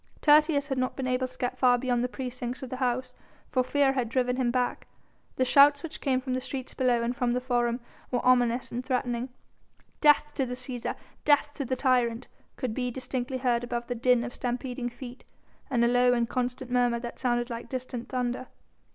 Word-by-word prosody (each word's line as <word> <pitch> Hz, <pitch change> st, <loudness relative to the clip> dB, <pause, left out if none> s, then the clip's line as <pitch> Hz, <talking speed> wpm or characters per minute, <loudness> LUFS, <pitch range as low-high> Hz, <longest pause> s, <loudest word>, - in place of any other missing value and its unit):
Tertius 300 Hz, -1 st, +4 dB
had 270 Hz, -1 st, -1 dB
not 255 Hz, 0 st, -1 dB
been 265 Hz, -, -3 dB
able 255 Hz, 0 st, 0 dB
to 255 Hz, -, -18 dB
get 245 Hz, -, -3 dB
far 250 Hz, -1 st, +5 dB
beyond 245 Hz, -1 st, 0 dB
the -, -, +1 dB
precincts 250 Hz, -1 st, -5 dB
of 255 Hz, -, -7 dB
the 255 Hz, -, -3 dB
house, 250 Hz, 0 st, -1 dB, 0.4 s
for 255 Hz, -, +2 dB
fear 275 Hz, +1 st, +2 dB
had 250 Hz, -4 st, -1 dB
driven 250 Hz, +1 st, +1 dB
him 255 Hz, -2 st, +1 dB
back. 250 Hz, 0 st, -1 dB, 0.5 s
The 255 Hz, -, +2 dB
shouts 285 Hz, +2 st, +6 dB
which 325 Hz, -2 st, -7 dB
came 265 Hz, -3 st, +1 dB
from 255 Hz, 0 st, -4 dB
the 255 Hz, -, -1 dB
streets 260 Hz, 0 st, -5 dB
below 245 Hz, -2 st, +2 dB
and 240 Hz, +2 st, -1 dB
from 245 Hz, -1 st, 0 dB
the 250 Hz, -, +1 dB
Forum 240 Hz, -1 st, 0 dB, 0.3 s
were 245 Hz, -, -1 dB
ominous 245 Hz, -1 st, +3 dB
and 245 Hz, +1 st, -3 dB
threatening. 250 Hz, -1 st, -1 dB, 0.7 s
"Death 295 Hz, 0 st, +4 dB
to 270 Hz, -3 st, +1 dB
the 250 Hz, -, -4 dB
Cæsar! 250 Hz, -1 st, -4 dB, 0.3 s
Death 290 Hz, 0 st, +3 dB
to 280 Hz, -, -4 dB
the 260 Hz, -, -1 dB
tyrant!" 250 Hz, -2 st, +1 dB, 0.3 s
could 255 Hz, -5 st, -2 dB
be 250 Hz, +1 st, -1 dB
distinctly 255 Hz, +1 st, -3 dB
heard 245 Hz, -2 st, +1 dB
above 240 Hz, 0 st, -3 dB
the 245 Hz, -, -3 dB
din 245 Hz, 0 st, +3 dB
of 245 Hz, 0 st, -5 dB
stampeding 245 Hz, 0 st, -3 dB
feet, 245 Hz, +1 st, -10 dB, 0.5 s
and 235 Hz, -2 st, +2 dB
a -, -, +4 dB
low 245 Hz, +1 st, +4 dB
and 235 Hz, -1 st, +1 dB
constant 250 Hz, +1 st, -3 dB
murmur 245 Hz, -1 st, +2 dB
that 240 Hz, 0 st, -7 dB
sounded 240 Hz, -1 st, 0 dB
like 230 Hz, 0 st, -6 dB
distant 255 Hz, -2 st, -5 dB
thunder. 250 Hz, 0 st, -2 dB
250 Hz, 205 wpm, -28 LUFS, 245-260 Hz, 0.7 s, shouts